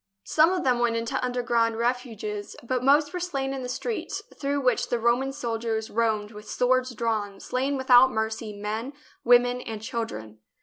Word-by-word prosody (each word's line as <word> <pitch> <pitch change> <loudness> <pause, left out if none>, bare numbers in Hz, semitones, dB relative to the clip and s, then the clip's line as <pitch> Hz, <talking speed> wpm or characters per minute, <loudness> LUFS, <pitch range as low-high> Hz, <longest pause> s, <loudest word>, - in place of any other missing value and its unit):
Some 315 +3 +4
of 370 -1 -1
them 250 -2 +2
went 240 -1 +2
into 230 +4 -2
underground 235 -2 +1
refuges, 230 -4 -3
but 250 +1 -1
most 295 +4 +4
were 360 - -2
slain 275 -7 -2
in 270 - -4
the 250 - -5
streets, 455 - -4
through 285 0 -1
which 255 -1 +1
the 240 - +1
Roman 240 +4 +1
soldiers 225 -3 -3
roamed 215 -2 0
with 210 -1 -11
swords 255 0 +1
drawn, 215 -3 -2
slaying 270 +2 -1
without 260 0 +6
mercy 220 0 -2
men, 215 +6 -4 0.3
women, 245 +1 +4
and 225 -3 -6
children. 220 - -5
240 Hz, 170 wpm, -26 LUFS, 225-260 Hz, 0.3 s, without